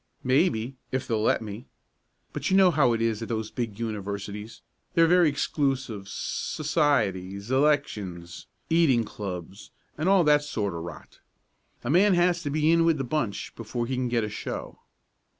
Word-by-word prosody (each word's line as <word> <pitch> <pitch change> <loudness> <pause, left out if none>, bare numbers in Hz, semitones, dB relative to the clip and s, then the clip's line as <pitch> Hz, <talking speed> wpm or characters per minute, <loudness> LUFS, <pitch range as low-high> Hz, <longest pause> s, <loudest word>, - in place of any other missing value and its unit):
"Maybe 130 -2 +1
if 130 -1 -2
they'll 110 -2 0
let 110 - +2
me. 110 +3 -8 0.7
But - - -2
you 190 - +4
know 190 -2 +6
how 140 -6 +3
it 115 0 0
is 115 -1 0
at 115 - -5
those 110 -2 -3
big 115 -5 -4
universities. 105 -1 -5 0.3
They 165 - +6
are - - +5
very 175 -1 +5
exclusive 135 -8 -1
societies 110 - -1
elections 110 - 0 0.2
eating 160 -8 +3
clubs 95 -2 -7 0.3
and 165 +5 +1
all 195 -2 +5
that 150 -1 +5
sort 110 -10 -3
of 85 - -5
rot. 85 +1 -10 0.6
A 120 - -1
man 190 +3 +5
has 175 0 +2
to 145 - -3
be 155 +2 +2
in 165 0 +4
with 165 -1 +3
the 135 - -2
bunch 125 -6 -3
before 120 +1 -4
he 130 - -3
can 125 -1 -1
get 120 -1 +1
a - - -1
show." 105 - -6
125 Hz, 170 wpm, -26 LUFS, 105-150 Hz, 0.7 s, know